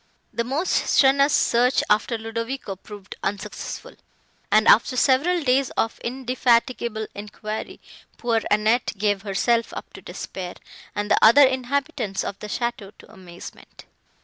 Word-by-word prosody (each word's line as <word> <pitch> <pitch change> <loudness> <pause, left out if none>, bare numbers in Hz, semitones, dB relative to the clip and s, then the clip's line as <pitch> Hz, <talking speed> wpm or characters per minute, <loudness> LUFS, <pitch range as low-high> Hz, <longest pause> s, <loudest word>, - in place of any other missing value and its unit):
The 235 - -1
most 280 +9 -2 0.2
strenuous 275 +1 +4
search 245 0 +3
after 215 +3 +1
Ludovico 230 0 -5
proved 205 +1 -11
unsuccessful, 200 0 -5 0.6
and, - - +4
after 475 - +5
several 300 +7 +2
days 260 0 +2
of 225 - -1
indefatigable 240 -2 0
enquiry, 210 +1 -7 0.4
poor 230 -2 0
Annette 215 +4 +2
gave 205 -1 0
herself 220 +4 0
up - - -8
to - - -11
despair, 180 -2 -7 0.4
and 205 0 -3
the - - +5
other 235 +6 +8
inhabitants 260 -6 -2
of 200 - -6
the 210 - -7
château 215 -3 -4
to - - -17
amazement. 180 -2 -13
230 Hz, 130 wpm, -23 LUFS, 210-260 Hz, 0.6 s, other